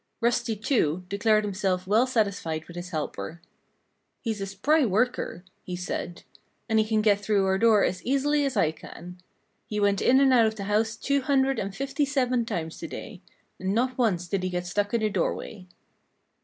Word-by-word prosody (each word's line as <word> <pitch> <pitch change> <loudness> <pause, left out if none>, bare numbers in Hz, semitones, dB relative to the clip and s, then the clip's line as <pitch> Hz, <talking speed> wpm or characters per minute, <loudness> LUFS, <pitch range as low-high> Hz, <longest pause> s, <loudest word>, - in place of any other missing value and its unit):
Rusty, 235 -1 +1
too, 185 - 0
declared 215 +1 +2
himself 190 -2 -1
well 220 +6 +3
satisfied 200 -9 -1
with 170 - -11
his 175 +1 -6
helper. 160 +1 -5 0.8
"He's 220 -5 -2
a 195 - -3
spry 280 +12 +2
worker," 225 -3 0 0.2
he 180 - -5
said. 175 -1 -5 0.4
"And 220 -1 +2
he 215 - +3
can 215 -1 +1
get 205 -2 +4
through 205 -1 +2
our 190 0 +1
door 220 -2 +5
as 185 - -1
easily 285 +3 +1
as 275 -2 -1
I 155 - +3
can. 175 +2 -11 0.5
He 210 -2 -3
went 200 -1 +2
in 260 +2 +5
and 270 -1 +5
out 230 -3 +5
of 220 - -2
the 200 - -6
house 215 +2 0
two 280 +5 0
hundred 270 0 +2
and 195 0 -4
fifty 275 +4 -1
seven 255 -4 +1
times 160 -4 -4
to - - -5
day; - - -8 0.4
and 190 +2 -1
not 255 +2 +1
once 195 -9 0
did 195 +1 -1
he 185 - -1
get 180 0 -3
stuck 205 +3 -1
in 230 - +1
the 215 - +1
doorway." 190 -1 -3
210 Hz, 195 wpm, -26 LUFS, 185-245 Hz, 0.8 s, door